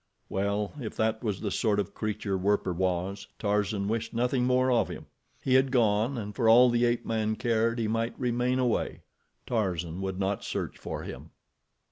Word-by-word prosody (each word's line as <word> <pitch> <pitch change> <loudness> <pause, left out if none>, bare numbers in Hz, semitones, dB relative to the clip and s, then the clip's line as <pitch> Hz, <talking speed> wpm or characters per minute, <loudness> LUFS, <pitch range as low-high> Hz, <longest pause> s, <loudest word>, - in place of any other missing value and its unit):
Well, 100 +1 -1
if 110 - -5
that 110 +1 0
was 105 -4 -2
the 105 - -2
sort 105 -1 +1
of 100 - -2
creature 105 -2 -2
Werper 95 -1 +1
was, 95 +3 -2
Tarzan 105 -1 0
wished 115 +2 -2
nothing 125 +1 +1
more 130 0 +3
of 120 -2 +2
him. - - -7 0.4
He 130 - +1
had 130 +1 +5
gone, 115 +1 +2
and 105 -2 -5
for 115 -4 +3
all 120 +2 +7
the 120 0 +3
ape 120 0 0
man 110 -1 0
cared, 115 0 +1
he 115 -2 0
might 115 +2 -1
remain 125 0 +1
away—Tarzan 95 -7 -2
would 95 -1 -3
not 100 +1 -1
search - - -4
for - - -5
him. - - -8
110 Hz, 175 wpm, -28 LUFS, 100-120 Hz, 0.4 s, all